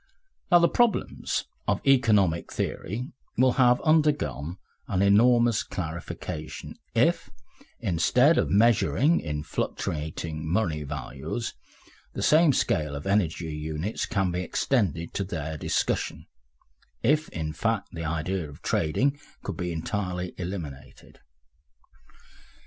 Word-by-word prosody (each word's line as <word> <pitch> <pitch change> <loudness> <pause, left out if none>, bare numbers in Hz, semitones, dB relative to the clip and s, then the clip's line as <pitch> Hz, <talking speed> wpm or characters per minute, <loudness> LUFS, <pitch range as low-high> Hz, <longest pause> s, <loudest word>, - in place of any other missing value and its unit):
Now 175 - +9
the 170 0 +5
problems 240 -1 0 0.2
of - - +2
economic 105 -11 +3
theory 120 - -3 0.3
will 130 +1 +5
have 125 -1 +5
undergone 150 - +1 0.3
an 95 0 +1
enormous 115 +2 +5
clarification 80 -3 -6 0.2
if, - - +2 0.5
instead 125 - +3
of - - +1
measuring 120 - +4
in 75 -2 -4
fluctuating 80 +1 -3
money 85 -6 +1
values, 70 -3 -5 0.6
the - - -3
same 155 0 +6
scale 75 - 0
of 70 - -6
energy 90 -5 0
units 80 +6 -3
can 95 -3 0
be 90 +1 -2
extended 90 - 0
to 100 - -1
their 80 -4 -4
discussion, 75 - -1 0.8
if, 150 +5 +2
in 80 -2 -4
fact, 110 +5 -1
the 85 -1 -6
idea 80 +1 -2
of 70 - -14
trading 135 - +1 0.2
could - - -4
be 90 -1 -3
entirely 90 +1 -3
eliminated. 85 -7 -7
90 Hz, 115 wpm, -27 LUFS, 80-120 Hz, 0.8 s, Now